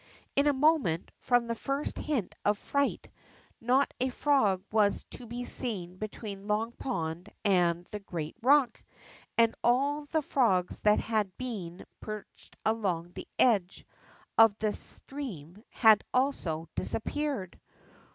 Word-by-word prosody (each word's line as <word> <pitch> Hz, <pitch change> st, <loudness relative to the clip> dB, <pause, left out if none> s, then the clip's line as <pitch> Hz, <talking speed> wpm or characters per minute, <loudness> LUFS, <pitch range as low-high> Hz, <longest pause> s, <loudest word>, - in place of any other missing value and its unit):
In 280 Hz, +1 st, +4 dB
a -, -, +6 dB
moment, 275 Hz, -, +2 dB
from 245 Hz, -1 st, +2 dB
the 230 Hz, -, -2 dB
first 275 Hz, +5 st, -3 dB
hint 270 Hz, -11 st, -2 dB
of 205 Hz, 0 st, +2 dB
fright, 280 Hz, +6 st, -1 dB, 0.5 s
not 255 Hz, +4 st, +2 dB
a 260 Hz, -, +1 dB
frog 235 Hz, -9 st, +2 dB
was 210 Hz, -2 st, +2 dB
to 245 Hz, -, -6 dB
be 240 Hz, +2 st, -5 dB
seen 185 Hz, -10 st, -2 dB
between 205 Hz, -2 st, -6 dB
Long 215 Hz, +2 st, 0 dB
Pond 170 Hz, -8 st, -4 dB, 0.2 s
and 175 Hz, -3 st, +3 dB
the 210 Hz, -, -4 dB
great 165 Hz, -6 st, -5 dB
rock. 260 Hz, -1 st, +4 dB, 0.6 s
And 230 Hz, -1 st, +5 dB
all 280 Hz, +5 st, +2 dB
the 315 Hz, +1 st, -1 dB
frogs 190 Hz, -11 st, +1 dB
that 210 Hz, 0 st, +4 dB
had 215 Hz, -4 st, -1 dB
been 195 Hz, -9 st, -6 dB
perched 215 Hz, -1 st, -9 dB
along 185 Hz, -6 st, 0 dB
the -, -, -8 dB
edge 200 Hz, -7 st, +2 dB, 0.5 s
of 225 Hz, -2 st, +7 dB
the 215 Hz, -1 st, 0 dB
stream 210 Hz, -, -5 dB
had 220 Hz, -3 st, +5 dB
also, 180 Hz, -, 0 dB
disappeared. 275 Hz, -, -2 dB
220 Hz, 130 wpm, -30 LUFS, 185-260 Hz, 0.6 s, of